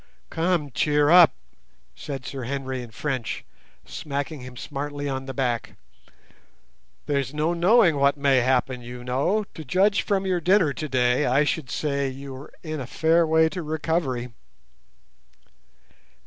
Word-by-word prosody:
"Come, 165 -3 0
cheer 150 +3 +2
up!" 175 -2 +8 0.6
said 135 -3 -7
Sir 135 -3 -5
Henry 130 -1 -3
in 120 - -9
French, 125 +1 -4 0.4
smacking 145 -1 -5
him 125 0 -10
smartly 145 +1 -5
on 135 -1 -4
the - - -3
back. 120 -5 -2 1.3
"There's 140 -1 -1
no 155 +3 +1
knowing 175 -1 +4
what 140 +1 +3
may 140 -2 +3
happen, 125 0 +1
you 120 +1 -9
know. 145 +13 0
To 160 - -8
judge 195 +8 +2
from 195 -1 -1
your 180 -2 0
dinner 180 -4 +3
today, 130 -2 +1
I 135 +4 +3
should 145 -2 -2
say 140 -2 -1
you 135 +1 -8
were 130 +2 -10
in 155 -2 -4
a 125 - -6
fair 165 +4 +2
way 160 0 +4
to 180 +2 -5
recovery." 150 -6 -2
145 Hz, 145 wpm, -24 LUFS, 130-160 Hz, 1.3 s, up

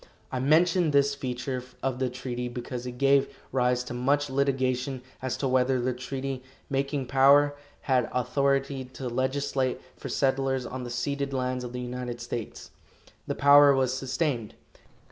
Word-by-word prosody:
I 130 - -2
mention 165 +5 +3
this 140 -1 +3
feature 130 -1 -4 0.2
of 130 -1 -1
the 130 -1 0
treaty 125 0 -4
because 125 0 -5
it 125 0 -7
gave 140 0 +3
rise 125 -1 +1
to 125 - -7
much 140 +3 +1
litigation 130 -1 0 0.2
as 130 -1 -2
to 135 - -1
whether 130 0 +2
the 125 +1 0
treaty 130 +1 -4 0.3
making 140 0 -1
power 140 +3 +5 0.3
had 130 -4 +1
authority 135 +2 0
to 130 0 -7
legislate 130 +1 -1 0.2
for - - -7
settlers 135 -1 +1
on 125 +2 -5
the 120 - -6
ceded 140 +2 -2
lands 130 -1 -1
of 120 - -6
the 125 0 -5
United 125 -1 -5
States. 120 -2 -6 0.6
The - - -2
power 140 0 +7
was 130 -1 +1
sustained. 130 -3 -2
130 Hz, 155 wpm, -27 LUFS, 125-140 Hz, 0.6 s, power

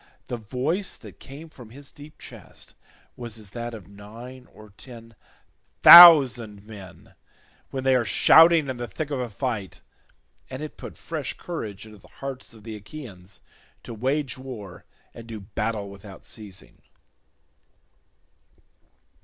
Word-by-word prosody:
The 120 - -4
voice 130 - -3
that - - -15
came 140 +4 -12
from 125 -8 -15
his 140 +4 -12
deep 145 +1 -15
chest - - -13 0.4
was 115 -2 -8
as 105 -3 -12
that 120 +1 -6
of 100 -6 -13
nine 115 +6 -13
or 105 -1 -16
ten 115 +2 -14 0.7
thousand 130 - +9
men 100 -4 -14 0.6
when 130 -1 -5
they 130 -1 +3
are 125 - +2
shouting 160 +8 +5
in 130 -2 -5
the 120 0 -6
thick 145 +9 -6
of 140 - -2
a 125 -1 -4
fight, 110 -3 -5 0.7
and 130 +3 -7
it 155 - -8
put - - -11
fresh 155 -5 -6
courage 110 - -7
into 110 -1 -15
the - - -20
hearts 135 -2 -9
of 110 - -17
the 110 -1 -8
Achaeans 100 -5 -12 0.4
to - - -9
wage 130 +3 -3
war 115 -8 -10 0.3
and 115 0 -12
do 110 -2 -8
battle 105 +1 -4
without 100 0 -13
ceasing. 105 -4 -10
120 Hz, 145 wpm, -24 LUFS, 105-135 Hz, 0.7 s, thousand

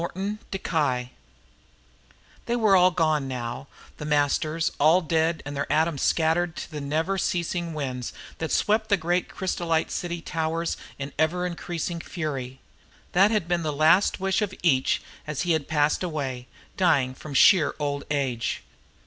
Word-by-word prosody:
_ 170 -9 -2 1.4
"They 240 - +1
were 215 -5 +4
all 180 0 +6
gone 155 -5 +1
now, 125 +1 -5 0.3
The 150 - -6
Masters, 155 +2 +1
all 160 +5 +5
dead 160 0 0
and 145 0 -5
their 140 - -2
atoms 160 -2 +1
scattered 165 +1 +2
to - - -7
the 150 -1 -5
never 160 +7 -1
ceasing 170 -2 -1
winds 130 -4 -3 0.3
that 160 - -3
swept 215 +1 +2
the 200 - +4
great 175 +1 0
crysolite 170 -3 -1
city 175 -1 -3
towers 165 0 -2 0.2
in 140 0 -6
ever 175 +3 +1
increasing 175 -1 -4
fury. 135 -7 -5 0.5
That 195 +3 +5
had 210 -6 0
been 175 -1 +1
the 155 -2 -1
last 155 +9 +4
wish 190 +1 +1
of 195 -2 -2
each 135 -6 +2 0.2
as 150 -3 -2
he 175 - +1
had 160 -3 0
passed 150 -1 +2
away, 135 -8 -3 0.3
dying 140 -9 +3
from 140 +2 -9
sheer 165 +2 +6
old 145 -1 -2
age. 135 -5 -1
160 Hz, 150 wpm, -25 LUFS, 145-175 Hz, 1.4 s, all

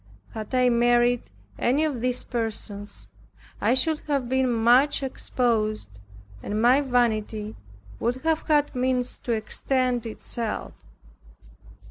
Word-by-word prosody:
Had 220 +3 -5
I 250 0 +4
married 240 0 +2 0.3
any 270 +6 +2
of 285 -7 -1
these 250 0 0
persons, 220 -3 -5 0.6
I - - +3
should 300 +4 +2
have 280 -4 0
been 260 0 +1
much 245 +5 +3
exposed, 215 - -1 0.4
and 210 +1 -3
my 250 +5 +5
vanity 220 -5 0 0.4
would 240 +2 0
have 320 -1 +1
had 295 -2 +2
means 250 -1 -1
to 240 - -2
extend 245 +2 -1
itself. 225 0 -4
245 Hz, 115 wpm, -25 LUFS, 225-260 Hz, 0.6 s, my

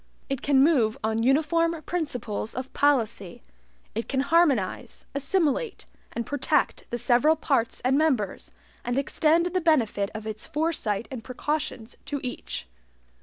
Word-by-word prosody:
It 275 -1 -1
can 275 -1 +4
move 255 -9 +3
on 220 +1 0
uniform 320 +6 +2
principles 250 -11 -3
of 255 +1 -5
policy. 230 -10 +1 0.5
It 225 +2 -4
can 265 -1 +1
harmonize, 280 - +1
assimilate, 330 - 0 0.3
and 235 - -3
protect 285 -2 0
the 240 - -2
several 250 +6 +4
parts 270 -7 0
and 265 +3 +3
members, 255 -11 0 0.3
and 245 +1 -2
extend 310 +4 +2
the 365 +1 0
benefit 230 - +2
of 215 0 -6
its 215 0 -5
foresight 300 -10 -1
and 245 -4 -6
precautions 255 -3 -3
to 285 - -3
each. 245 - -5
270 Hz, 135 wpm, -26 LUFS, 230-315 Hz, 0.5 s, can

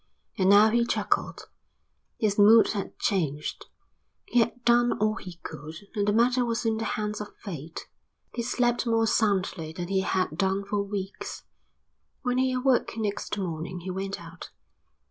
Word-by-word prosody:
And 190 -3 +2
now 210 +2 +7
he 235 +1 +3
chuckled. 235 - -1 0.7
His 210 -2 0
mood 220 +2 +7
had 200 -2 -4
changed. 150 -7 -2 0.6
He 245 - +2
had 235 +1 0
done 240 0 +4
all 215 +1 +1
he 180 -2 -8
could 155 0 -8 0.2
and 205 -2 0
the - - +4
matter 245 +3 +3
was 230 -1 -2
in 225 -1 +1
the 225 - -3
hands 210 0 -3
of 210 - -9
fate. 165 -5 -7 0.5
He 235 - -2
slept 240 0 0
more 225 -1 +3
soundly 195 -7 0
than 175 +1 -5
he 195 -1 +2
had 185 -3 0
done 195 +1 +1
for 205 0 -1
weeks. 200 -1 -5 0.8
When 250 -1 +1
he 260 0 +2
awoke 255 -2 +1
next 210 -1 -2
morning 175 -1 -4
he 185 +2 -5
went 195 +1 -4
out. 170 +1 -10
205 Hz, 165 wpm, -27 LUFS, 185-230 Hz, 0.8 s, now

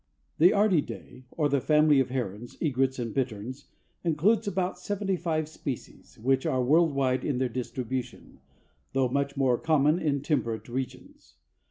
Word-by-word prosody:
The 175 +4 +7
Ardeidae, 180 -10 0
or 150 -3 0
the 140 -2 +1
family 150 -1 +4
of 130 - +1
herons, 120 -3 -4
egrets 135 -3 +1
and 115 -3 -3
bitterns, 130 +2 -3 0.4
includes 190 +7 +2
about 185 -2 -1
seventy 195 0 -1
five 160 -3 -1
species, 140 -4 -7
which 130 +4 +1
are 130 -1 +1
world 155 +3 +3
wide 130 -2 +1
in 140 -4 -1
their 130 0 0
distribution, 125 +1 -5 0.5
though 130 -1 +2
much 140 +2 -1
more 130 -3 +2
common 155 0 +3
in 145 -4 0
temperate 115 -8 -1
regions. 120 - -7
135 Hz, 150 wpm, -28 LUFS, 125-155 Hz, 0.5 s, The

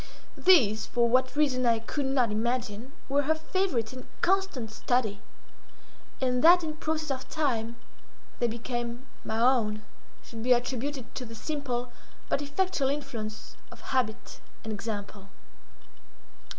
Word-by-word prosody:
These, 240 - +5
for 235 -1 +2
what 255 +3 +2
reason 275 -4 +2
I 230 -1 +4
could 265 +5 -3
not 255 -4 +2
imagine, 235 +1 -2 0.2
were 280 +1 +3
her 310 +3 +2
favourite 315 - -1
and 255 - -9
constant 370 - +1
study—and 250 +2 -3
that 350 +2 +8
in 310 -1 -4
process 310 -1 -2
of 260 -1 -4
time 235 -7 0 0.6
they 240 - +3
became 240 +1 -4 0.2
my 220 - -2
own, 225 -4 +3 0.4
should 225 -1 -8
be 250 +2 +5
attributed 255 +2 -2
to 255 - -4
the 230 -1 -9
simple 250 -2 -3 0.4
but - - +1
effectual 290 -1 0
influence 230 -7 -5
of - - -12
habit 245 -5 -1 0.2
and 220 - -3
example. 205 -2 -5
250 Hz, 130 wpm, -29 LUFS, 225-285 Hz, 0.6 s, that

